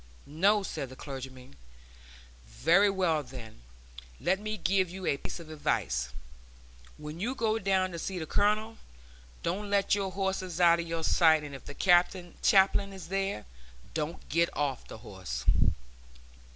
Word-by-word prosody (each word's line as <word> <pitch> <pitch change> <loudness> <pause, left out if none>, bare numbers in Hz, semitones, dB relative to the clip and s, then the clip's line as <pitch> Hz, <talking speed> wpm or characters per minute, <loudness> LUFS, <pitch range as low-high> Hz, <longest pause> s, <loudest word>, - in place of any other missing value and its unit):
"No," 195 +8 +2
said 135 -8 -4
the 130 - -10
clergyman. 130 - -9 0.9
"Very 170 - +4
well, 180 -5 +1
then, 125 - -11 0.6
let 180 +7 +1
me 215 +1 -4
give 185 0 +1
you 185 +1 -7
a 140 - +1
piece 140 - -6
of 160 -2 -10
advice. 65 - -1 0.9
When 150 +2 -8
you 240 +8 -2
go 225 -2 +1
down 190 -2 +1
to 170 - -5
see 190 +2 -4
the 160 - -3
Colonel, 215 +5 +1 0.7
don't 200 +5 -2
let 200 -1 +2
your 195 -2 0
horse 190 0 -1 0.2
out 170 -1 +6
of 170 - -3
your 165 0 -3
sight; 160 -2 +4
and 145 -1 -7
if 135 - -10
the 145 - -8
chaplain 190 +2 +3
is 180 -3 -9
there, 195 - -2 0.5
don't 155 +2 -4
get 170 +2 +2
off 140 -3 -1
the - - -9
horse!" 90 - -6
175 Hz, 150 wpm, -30 LUFS, 145-195 Hz, 0.9 s, out